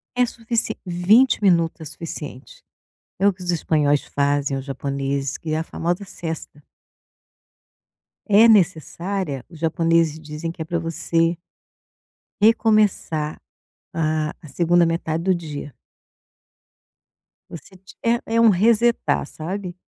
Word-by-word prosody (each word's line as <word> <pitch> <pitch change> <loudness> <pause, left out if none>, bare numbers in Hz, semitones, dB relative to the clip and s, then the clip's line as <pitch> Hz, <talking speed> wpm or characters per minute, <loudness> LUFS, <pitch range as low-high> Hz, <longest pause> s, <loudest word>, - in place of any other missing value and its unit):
É 250 0 +4
suficie 230 0 -3
20 195 +8 +3
minuto 170 -4 +2
é - - -7
suficiente. 150 -4 -9 0.6
É 195 - +2
o - - +3
que 185 0 -13
os 180 - -1
espanhóis 150 -4 +1
fazem 140 -1 0
aos 135 - -5
japoneses 140 0 -3
que 155 - -5
é 155 - 0
a - - -1
famosa 175 +5 -3
sesta. 160 -5 -7 1.6
É 215 +2 +6
necessária 180 - +1
os 165 -1 -14
japoneses 165 -1 +1
dizem 155 +1 -6
que 165 -1 -7
é - - -4
para 170 +1 -2
você 165 +1 +1 1.1
recomeçar 210 -8 +2 0.6
a 155 -1 0
a 155 - -11
2ª 170 +4 +3
metade 165 0 -2
do 190 -1 +3
dia. 150 -4 -7 1.7
Você 170 +4 -11
ti 190 +1 -16
é 235 +1 +2
é 230 - +4
um 230 - +7
resetar 225 -2 +2
sabe? 180 +4 -6
165 Hz, 125 wpm, -22 LUFS, 155-195 Hz, 1.7 s, um